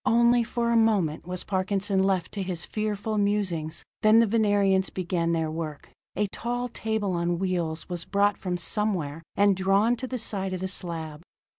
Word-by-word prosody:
Only 235 +1 +4
for 235 +1 -1
a - - +3
moment 200 -9 +2
was 180 0 -3
Parkinson 195 +1 0
left 190 -3 +1
to 205 - -4
his 180 -3 -2
fearful 215 0 -2
musings; 185 -6 0 0.2
then 215 +1 +6
the 230 - +6
Venerians 205 -3 +2
begin 175 -2 -1
their 160 -1 0
work. 155 -2 -6 0.3
A 210 - +1
tall 245 +1 -3
table 220 -3 -2
on 170 0 0
wheels 170 -3 -2
was 175 -2 -4
brought 200 +2 +2
from 180 -2 -2
somewhere, 175 -6 -1
and 200 -1 +4
drawn 195 +5 +3
to 255 +2 -4
the 255 - -3
side 195 -4 -2
of 185 - -3
the 190 - -2
slab. 165 -5 -4
195 Hz, 175 wpm, -26 LUFS, 175-215 Hz, 0.3 s, then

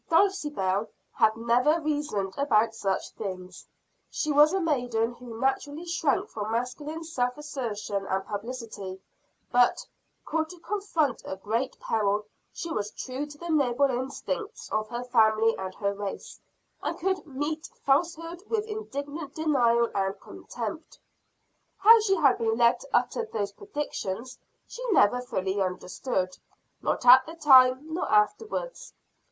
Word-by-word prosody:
Dulcibel 295 - +2 0.2
had 220 0 +3
never 245 +8 +3
reasoned 290 -11 -2
about 230 -5 +2
such 195 -4 -2
things; 185 -3 -7 0.4
she 305 - -1
was 295 +2 +6
a 385 - +1
maiden 245 -8 0
who 240 -2 -10
naturally 285 +5 -1
shrank 335 -5 0
from 215 0 -4
masculine 290 +7 -3
self 250 -6 -1
assertion 215 -9 -4
and 190 +1 -1
publicity; 210 -3 -6 0.5
but, 245 0 +3 0.4
called 315 0 -1
to 360 - -11
confront 345 - -1
a - - -5
great 225 +7 -2
peril, 210 -1 0 0.3
she 335 - -6
was 210 -8 -2
true 265 +6 -5
to 295 0 -12
the 345 +2 -7
noble 275 -2 +3
instincts 270 - -4
of 215 0 -1
her 240 +1 -4
family 225 -2 +3
and 185 -1 -6
her 200 -1 -1
race, 200 -1 -6 0.4
and - - -3
could 380 +1 -1
meet 295 +3 -3 0.2
falsehood 330 +4 0
with 440 -2 0
indignant 300 -9 -6
denial 240 -7 +3
and 195 0 -1
contempt. - - -7 0.8
How 450 +4 +8
she 395 -2 +2
had 285 -7 +3
been 225 -1 +1
led 235 0 +4
to 275 - -13
utter 470 - +1
those 205 -2 -2
predictions 255 - -5 0.3
she - - -9
never 250 - +4
fully 195 -5 -2
understood 185 +1 -2 0.4
not - - -1
at 255 +1 +9
the 325 - -8
time 270 -1 +6
nor 360 - -2
afterwards. 445 - 0
255 Hz, 140 wpm, -27 LUFS, 215-310 Hz, 0.8 s, at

